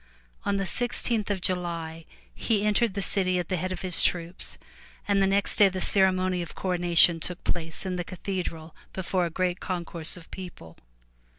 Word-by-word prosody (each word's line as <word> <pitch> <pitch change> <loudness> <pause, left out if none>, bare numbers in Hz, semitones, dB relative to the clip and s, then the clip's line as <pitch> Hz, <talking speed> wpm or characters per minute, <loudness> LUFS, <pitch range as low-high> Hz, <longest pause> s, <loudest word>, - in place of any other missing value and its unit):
On 200 - +1
the 195 - -1
sixteenth 235 0 +1
of 195 -2 -1
July, 170 -3 -3 0.3
he 210 -3 0
entered 210 0 +2
the 200 - -1
city 185 -2 +2
at 175 -2 -3
the 185 - 0
head 185 +2 -3
of 185 - -5
his 180 -2 +2
troops 175 0 -1 0.5
and 200 -1 +3
the 195 - +4
next 200 +1 +3
day 200 -2 +7
the 185 0 -4
ceremony 185 -1 +2
of 170 - -7
coronation 175 -2 +4
took 180 +2 -5
place 165 +1 -3
in 185 -1 -2
the 175 - -2
cathedral 175 -3 -5 0.2
before 185 -1 -1
a - - -5
great 180 +2 -1
concourse 170 -2 -1
of 165 - -14
people. 175 - -9
185 Hz, 180 wpm, -27 LUFS, 170-195 Hz, 0.5 s, day